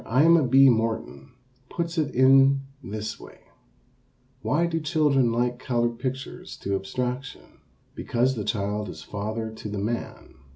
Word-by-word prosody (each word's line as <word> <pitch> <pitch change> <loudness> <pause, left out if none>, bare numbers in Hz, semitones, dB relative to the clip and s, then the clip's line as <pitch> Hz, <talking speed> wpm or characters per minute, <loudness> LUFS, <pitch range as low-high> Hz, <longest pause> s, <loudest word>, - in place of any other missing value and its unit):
Aima 150 +3 +4
B. 135 +2 +7
Morton 115 +2 -1 0.4
puts 170 0 -3
it 145 -3 -2
in 135 +1 +5 0.2
this 110 +1 -5
way: - - -14 1.0
Why 165 +5 +1
do 165 -1 -1
children 145 -5 +2
like 120 +1 0
colored 120 -2 -1
pictures 130 +2 -5
to 100 - -2
abstraction? 125 +7 -5 0.3
Because 125 +3 0
the 110 -5 -4
child 105 -1 -2
is 80 -2 -9
father 110 +2 -4
to 110 -1 -8
the 105 - -4
man. 110 +4 -4
125 Hz, 135 wpm, -25 LUFS, 110-135 Hz, 1.0 s, B